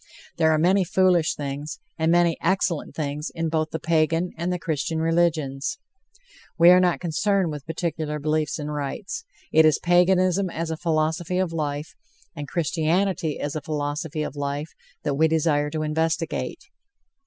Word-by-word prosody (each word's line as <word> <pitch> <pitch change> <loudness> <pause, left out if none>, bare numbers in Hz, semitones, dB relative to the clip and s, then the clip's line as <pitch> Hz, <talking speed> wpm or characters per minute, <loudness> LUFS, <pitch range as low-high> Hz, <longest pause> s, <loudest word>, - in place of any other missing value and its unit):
There 160 -1 +4
are 155 - +3
many 185 +5 +3
foolish 180 -2 +2
things, 145 +1 -5 0.2
and 160 0 +1
many 170 -1 +4
excellent 180 -2 0
things, 150 0 -3
in 165 0 -1
both 155 0 0
the 160 - -3
Pagan 165 +2 +1
and 170 +2 -2
the 180 - 0
Christian 160 -1 -2
religions. 160 -4 0 0.8
We 170 0 +8
are 180 - +7
not 180 -2 +2
concerned 180 +1 0
with 150 -1 -7
particular 160 -2 -3
beliefs 155 0 -1
and 150 -1 -4
rites; 190 - -4 0.3
it 160 - +6
is 155 -2 +5
Paganism 185 +2 +3
as 165 -1 -3
a - - -1
philosophy 160 +2 0
of 185 -3 0
life, 150 -1 -3 0.4
and 145 -2 -6
Christianity 165 +2 0
as 145 +1 -3
a 155 - -2
philosophy 150 +1 -3
of 150 - -5
life, 145 +2 -3 0.3
that 145 - 0
we 160 +3 +3
desire 155 -2 +1
to 155 0 -3
investigate. 160 +1 -2
160 Hz, 160 wpm, -24 LUFS, 150-175 Hz, 0.8 s, We